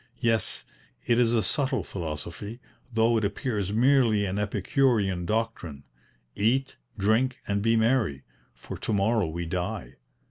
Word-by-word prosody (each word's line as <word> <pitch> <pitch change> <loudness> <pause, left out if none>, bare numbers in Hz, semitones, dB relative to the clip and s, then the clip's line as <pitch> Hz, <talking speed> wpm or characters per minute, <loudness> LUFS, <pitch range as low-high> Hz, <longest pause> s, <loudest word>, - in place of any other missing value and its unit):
Yes, 115 -1 0 0.4
it 120 0 +3
is 120 -2 +4
a 110 - +2
subtle 130 +8 0
philosophy, 85 +6 -6 0.3
though 115 0 +3
it 110 - 0
appears 100 -1 -1
merely 115 -3 +4
an 100 +1 -2
epicurean 105 -3 +1
doctrine: 105 -10 -2 0.5
'Eat, 130 +6 +1 0.2
drink, 115 +6 +2
and 100 0 0
be 115 +2 +3
merry, 110 - +1 0.3
for - - -8
to - - -2
morrow 105 -1 +2
we 85 +2 -4
die.' 90 +4 -4
110 Hz, 135 wpm, -27 LUFS, 95-115 Hz, 0.5 s, is